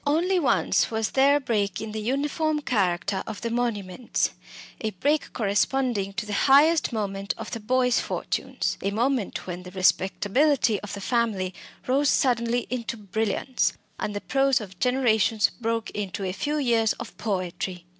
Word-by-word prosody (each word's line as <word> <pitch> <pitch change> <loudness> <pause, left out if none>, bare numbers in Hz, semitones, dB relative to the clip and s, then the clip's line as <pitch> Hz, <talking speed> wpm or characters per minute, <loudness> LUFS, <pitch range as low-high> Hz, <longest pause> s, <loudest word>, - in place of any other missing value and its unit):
Only 350 +6 +2
once 285 - +2
was 220 -1 -1
there 275 +2 +5
a - - +3
break 205 -7 -1
in 220 0 -5
the 215 0 -4
uniform 295 +6 0
character 190 -5 0
of 220 - -6
the 230 - -2
monuments 230 -2 -1 0.5
a 220 - -1
break 285 +10 0
corresponding 210 -1 0
to 215 +2 -3
the 210 - -5 0.2
highest 300 +4 +5
moment 200 -3 -2
of - - -7
the 230 - -4
Boyce 250 +2 +2
fortunes, - - -2
a 195 - 0
moment 235 +1 -1
when 180 -1 -5
the 180 - -10
respectability 205 +6 +2
of 210 - -7
the 200 - -7
family 205 -5 0 0.3
rose 275 +2 +2
suddenly 240 -1 +2
into 235 -2 -3
brilliance, 220 +4 -1 0.3
and 210 - -3
the 205 - -3
prose 270 -1 +2
of 190 -4 -10
generations 230 -4 +2
broke 230 -1 -1
into 200 -1 -4
a 185 - -1
few 295 +10 -2
years 230 -6 +2
of - - -9
poetry. 185 -3 -3
225 Hz, 160 wpm, -25 LUFS, 200-260 Hz, 0.5 s, there